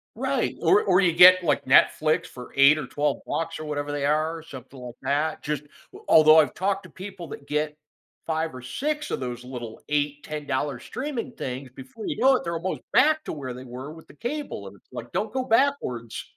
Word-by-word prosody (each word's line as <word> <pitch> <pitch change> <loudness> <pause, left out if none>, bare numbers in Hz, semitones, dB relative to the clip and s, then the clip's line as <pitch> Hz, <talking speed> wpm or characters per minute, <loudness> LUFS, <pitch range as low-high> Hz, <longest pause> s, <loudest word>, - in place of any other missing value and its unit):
Right. - - -1
Or 410 +3 +4
or 180 - +4
you 180 -3 +4
get, 180 +2 +8
like, 150 -4 +1
Netflix 155 +3 +4
for 125 -1 -11
8 140 +2 +7
or 150 - -4
12 145 +1 -1
bucks 165 -1 -3
or 155 - -6
whatever 145 -1 -3
they 145 -1 -2
are, 155 +2 0
something 135 -3 -11
like 125 -1 -8
that. 150 +3 -1
Just 150 -1 -3 0.4
although 155 0 +7
I've 155 - +2
talked 195 +1 -1
to 185 - -13
people 185 -1 -9
that 140 - -9
get 150 0 -1 0.5
5 160 -2 -1
or 130 - -8
6 300 - -3
of - - -1
those 125 -1 -5
little 120 -3 -8
8 145 0 -1
$10 145 -3 -3
streaming 260 - -5
things, 130 - -6
before 135 - -10
you - - -3
know 265 +1 +6
it, - - -2
they're 170 0 -2
almost 180 +3 -4
back 310 +3 +4
to - - -4
where 130 -4 -6
they 130 - -9
were 130 +4 -8
with 160 0 -13
the - - -16
cable, 290 - -5
and - - -11
it's - - -30
like, - - -8
don't - - -2
go 260 - 0
backwards, 225 - 0
155 Hz, 210 wpm, -25 LUFS, 135-185 Hz, 0.5 s, get